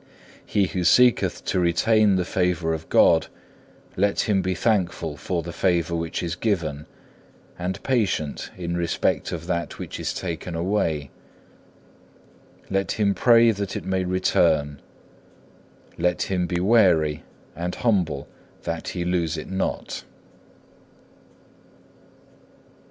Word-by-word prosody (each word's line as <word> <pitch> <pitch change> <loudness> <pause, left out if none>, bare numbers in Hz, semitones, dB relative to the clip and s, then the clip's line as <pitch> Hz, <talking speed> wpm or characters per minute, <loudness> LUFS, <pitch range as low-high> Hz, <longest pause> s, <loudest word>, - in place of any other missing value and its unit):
He 100 -2 +1
who 90 -1 -3
seeketh 125 +8 +4
to - - 0
retain 100 +4 +3
the 90 -1 0
favour 90 -3 0
of 80 0 -6
God, - - +5 0.7
let 100 +2 +1
him 100 -3 +1
be 95 0 -1
thankful 90 -6 0
for 85 +2 -3
the 85 +1 -7
favour 85 -2 +1
which 85 +1 -3
is 85 -1 -2
given, 85 -8 -2 0.7
and 90 +1 -4
patient 100 - -1
in 85 -1 -3
respect 85 -1 0
of - - -5
that 85 -2 -3
which - - -7
is - - -2
taken 85 -1 -5
away. 80 -5 -1 1.6
Let 95 0 -1
him 100 -2 +1
pray 115 +1 +5
that 100 -2 -4
it - - -5
may 95 0 0
return; 75 -5 +1 1.2
let 90 +1 +1
him 90 -2 -1
be 85 0 -1
wary 90 -7 +3 0.3
and 90 +2 -3
humble 90 - 0 0.4
that 85 0 -4
he 85 - -1
lose 85 -2 0
it 75 - -7
not. 95 0 -3
90 Hz, 125 wpm, -24 LUFS, 85-95 Hz, 1.6 s, God